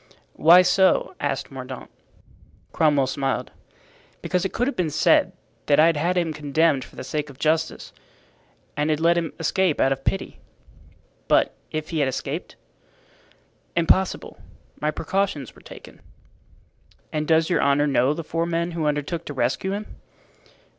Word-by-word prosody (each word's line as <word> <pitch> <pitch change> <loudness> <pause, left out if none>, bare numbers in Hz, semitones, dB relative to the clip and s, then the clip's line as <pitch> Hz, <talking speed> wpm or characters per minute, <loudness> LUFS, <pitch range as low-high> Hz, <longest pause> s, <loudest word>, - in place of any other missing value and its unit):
"Why 175 +4 +7
so?" 185 +1 +3
asked 140 -1 -3
Mordaunt. 130 -1 -8 0.8
Cromwell 150 -4 +3
smiled. 135 +1 -2 0.7
"Because 180 -1 0
it 195 - -2
could 245 - 0
have 280 - -2
been 175 -4 0
said - - +3 0.4
that 145 - +4
I 155 - +7
had 165 -1 +3
had 175 +4 0
him 165 -3 0
condemned 150 -1 +1
for - - -15
the - - -7
sake 150 -1 -3
of 135 - -13
justice 160 +2 -1 0.8
and 150 +1 0
had 155 -1 +1
let 170 +1 +4
him 165 -3 -1
escape 170 +1 +1
out 135 - +3
of 135 0 -2
pity." 195 - -3 0.9
"But - - +3
if 155 +1 -5
he 160 - -1
had 140 - +2
escaped?" 130 - -5 1.2
"Impossible; 175 +3 +1 0.4
my 150 - 0
precautions 155 - -2
were - - -18
taken." - - -13 1.1
"And 155 0 -2
does 160 0 +3
your - - +2
honor 140 +1 +3
know 140 0 +2
the 165 - -5
four 165 +2 -2
men 170 0 -1
who 165 -2 -2
undertook 150 +3 -2
to 145 - -7
rescue 130 +10 -1
him?" 210 +1 -4
155 Hz, 155 wpm, -23 LUFS, 145-170 Hz, 1.2 s, Why